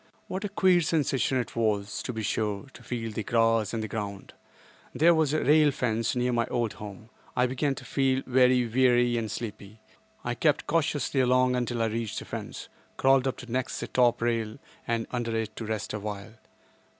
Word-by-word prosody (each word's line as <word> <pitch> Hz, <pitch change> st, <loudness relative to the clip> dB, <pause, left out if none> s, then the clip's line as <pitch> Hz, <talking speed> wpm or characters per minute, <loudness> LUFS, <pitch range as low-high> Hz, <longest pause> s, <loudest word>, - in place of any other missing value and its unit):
What 190 Hz, +3 st, -4 dB
a 205 Hz, -, -2 dB
queer 185 Hz, -3 st, +4 dB
sensation 145 Hz, -5 st, +1 dB
it 125 Hz, -, -3 dB
was, 105 Hz, -3 st, 0 dB
to -, -, -4 dB
be 110 Hz, -2 st, -4 dB
sure, 105 Hz, -1 st, -1 dB
to -, -, -13 dB
feel 115 Hz, -2 st, -4 dB
the 110 Hz, -, -3 dB
grass 115 Hz, -1 st, +2 dB
and 115 Hz, -1 st, -2 dB
the -, -, -3 dB
ground! 100 Hz, -2 st, -5 dB, 0.6 s
There 170 Hz, +3 st, +5 dB
was 160 Hz, -3 st, +2 dB
a 155 Hz, -, 0 dB
rail 150 Hz, +2 st, +5 dB
fence 115 Hz, -4 st, -1 dB
near 125 Hz, 0 st, +1 dB
my 115 Hz, -1 st, +1 dB
old 115 Hz, -3 st, -1 dB
home. 105 Hz, +2 st, -10 dB, 0.2 s
I 125 Hz, -, +3 dB
began 135 Hz, +2 st, 0 dB
to -, -, -10 dB
feel 135 Hz, -1 st, +1 dB
very 125 Hz, -1 st, +4 dB
weary 120 Hz, 0 st, +3 dB
and 110 Hz, -2 st, -2 dB
sleepy. 105 Hz, -1 st, -7 dB, 0.4 s
I 120 Hz, -, -1 dB
crept 150 Hz, +4 st, +1 dB
cautiously 150 Hz, -4 st, 0 dB
along 130 Hz, 0 st, +3 dB
until 120 Hz, -2 st, -1 dB
I -, -, +2 dB
reached 110 Hz, -1 st, -3 dB
the -, -, -5 dB
fence; -, -, -6 dB, 0.3 s
crawled 135 Hz, 0 st, +4 dB
up 130 Hz, -, -2 dB
to 125 Hz, -1 st, -10 dB
next 130 Hz, +1 st, -2 dB
the -, -, -3 dB
top 120 Hz, -2 st, +2 dB
rail 115 Hz, -2 st, -1 dB, 0.3 s
and 115 Hz, -1 st, 0 dB
under 120 Hz, -2 st, -2 dB
it 110 Hz, -1 st, -3 dB
to 115 Hz, -, -4 dB
rest 110 Hz, -1 st, -3 dB
awhile. 105 Hz, 0 st, -5 dB
120 Hz, 195 wpm, -28 LUFS, 110-130 Hz, 0.6 s, There